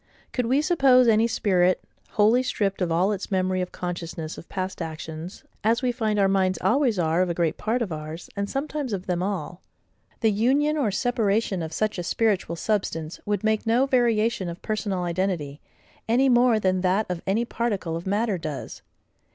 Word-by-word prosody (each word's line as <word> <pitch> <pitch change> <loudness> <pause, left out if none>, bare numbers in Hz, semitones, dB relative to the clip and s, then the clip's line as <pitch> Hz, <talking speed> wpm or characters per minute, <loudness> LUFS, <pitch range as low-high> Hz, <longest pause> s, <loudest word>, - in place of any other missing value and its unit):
Could 250 -2 0
we 270 +5 +2
suppose 270 -7 +5
any 225 0 +4
spirit 185 -6 +2 0.3
wholly 220 +4 +4
stripped 205 -6 -1
of 175 -2 0
all 180 +5 +2
its 195 -2 -4
memory 185 -1 0
of 180 - -4
consciousness 170 -3 -5
of - - -12
past 185 -1 -4
actions, 160 +2 -7 0.2
as 230 +4 +2
we 250 - +2
find 220 -3 -1
our 200 -1 +4
minds 190 -1 +2
always 250 -4 +2
are 165 0 +2
of 185 - +1
a 170 - -1
great 170 -2 +1
part 235 +3 -1
of 200 - -5
ours, 155 +2 -6
and 200 0 -2
sometimes 280 -3 -3
of 190 -1 -3
them 180 -1 -1
all; 190 -2 -3 0.6
the 220 -2 +4
union 270 +8 +2
or 280 -8 +1
separation 210 -3 0
of 160 -1 -4
such 215 +2 -1
a - - -2
spiritual 195 -3 0
substance 165 -4 -2
would 205 +1 -1
make 220 +1 +1
no 240 +4 +4
variation 230 -7 +1
of 170 - -7
personal 205 -4 -2
identity, 170 -5 -2 0.5
any 260 +4 +4
more 240 -2 +4
than 185 -2 +1
that 190 +4 +2
of 180 -2 -4
any 220 +5 +1
particle 205 -9 -2
of 170 +3 -6
matter 205 -1 0
does. 155 -4 -6
200 Hz, 185 wpm, -25 LUFS, 180-230 Hz, 0.6 s, suppose